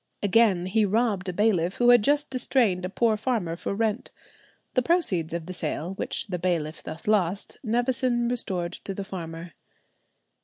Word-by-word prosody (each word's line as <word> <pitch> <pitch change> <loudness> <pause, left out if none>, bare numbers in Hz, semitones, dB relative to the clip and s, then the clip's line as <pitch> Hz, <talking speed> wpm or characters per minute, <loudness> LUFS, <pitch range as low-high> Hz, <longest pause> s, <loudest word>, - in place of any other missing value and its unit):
Again, 200 -3 +3
he 215 +4 +2
robbed 205 -2 +1
a - - -3
bailiff 185 -3 +1
who 245 0 +5
had 240 -3 +6
just 290 +3 +1
distrained 235 -8 +1
a - - -3
poor 225 +2 +2
farmer 210 -7 -1
for 190 - -4
rent. 220 +1 -1 0.6
The 255 - +3
proceeds 240 - +1
of 170 -1 -4
the 185 - -6
sale, 165 +1 -3
which - - -3
the 180 -4 -4
bailiff 165 -3 -1
thus 160 +1 -7
lost, 195 -2 0
Nevison 240 +1 +1
restored 185 -8 -2
to 195 - -7
the 200 - -4
farmer. 170 -3 -7
200 Hz, 165 wpm, -26 LUFS, 175-235 Hz, 0.6 s, had